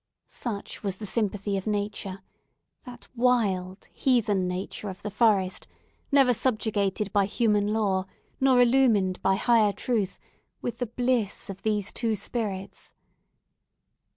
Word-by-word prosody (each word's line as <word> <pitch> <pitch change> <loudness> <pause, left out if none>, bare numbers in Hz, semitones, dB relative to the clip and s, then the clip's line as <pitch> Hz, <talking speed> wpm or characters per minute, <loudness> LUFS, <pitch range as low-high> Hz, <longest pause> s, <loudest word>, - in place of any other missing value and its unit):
Such 215 -5 -5
was 195 -3 -3
the 215 - -6
sympathy 205 -2 -1
of 190 - -5
Nature—that 205 +4 -7
wild, 205 -7 +1
heathen 215 -8 +2
Nature 185 +3 -4
of 185 - -9
the 210 - -4
forest, 200 -3 +2 0.4
never 270 -3 +5
subjugated 215 -4 0
by 200 -1 +4
human 210 -2 +1
law, 195 -4 +1 0.3
nor 265 -2 +4
illumined 235 -7 +3
by 195 - +3
higher 215 -1 +3
truth—with 235 +2 -4
the 245 - -1
bliss 235 -4 -1
of 195 0 -11
these 210 -2 -1
two 225 -2 -1
spirits! 200 -2 -5
210 Hz, 120 wpm, -27 LUFS, 195-235 Hz, 0.4 s, never